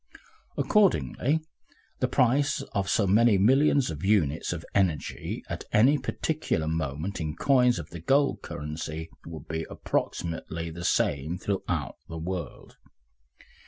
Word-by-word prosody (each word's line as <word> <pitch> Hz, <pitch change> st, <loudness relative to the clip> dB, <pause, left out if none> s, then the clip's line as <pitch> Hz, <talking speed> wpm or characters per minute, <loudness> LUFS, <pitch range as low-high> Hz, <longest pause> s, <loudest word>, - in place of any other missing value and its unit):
Accordingly, 160 Hz, -7 st, +2 dB, 0.6 s
the -, -, +2 dB
price 140 Hz, +3 st, +2 dB
of 100 Hz, -2 st, -1 dB
so 105 Hz, -, +3 dB
many 105 Hz, +2 st, +5 dB
millions 135 Hz, -, +4 dB
of 75 Hz, -2 st, -7 dB
units 85 Hz, -7 st, +2 dB
of 85 Hz, -2 st, -5 dB
energy 90 Hz, -8 st, -1 dB
at -, -, -5 dB
any 135 Hz, +7 st, +5 dB
particular 150 Hz, -, -1 dB
moment 80 Hz, +4 st, -2 dB
in 75 Hz, -1 st, -3 dB
coins 125 Hz, -4 st, +3 dB
of 85 Hz, -3 st, -7 dB
the 85 Hz, -, -7 dB
gold 140 Hz, -, +2 dB
currency 80 Hz, +2 st, -6 dB, 0.2 s
would 80 Hz, -2 st, -9 dB
be 80 Hz, 0 st, -3 dB
approximately 85 Hz, 0 st, -3 dB
the 85 Hz, +2 st, -6 dB
same 75 Hz, +3 st, +1 dB
throughout 95 Hz, +1 st, -2 dB
the 80 Hz, -, -6 dB
world. 85 Hz, 0 st, -6 dB
90 Hz, 125 wpm, -27 LUFS, 80-125 Hz, 0.6 s, many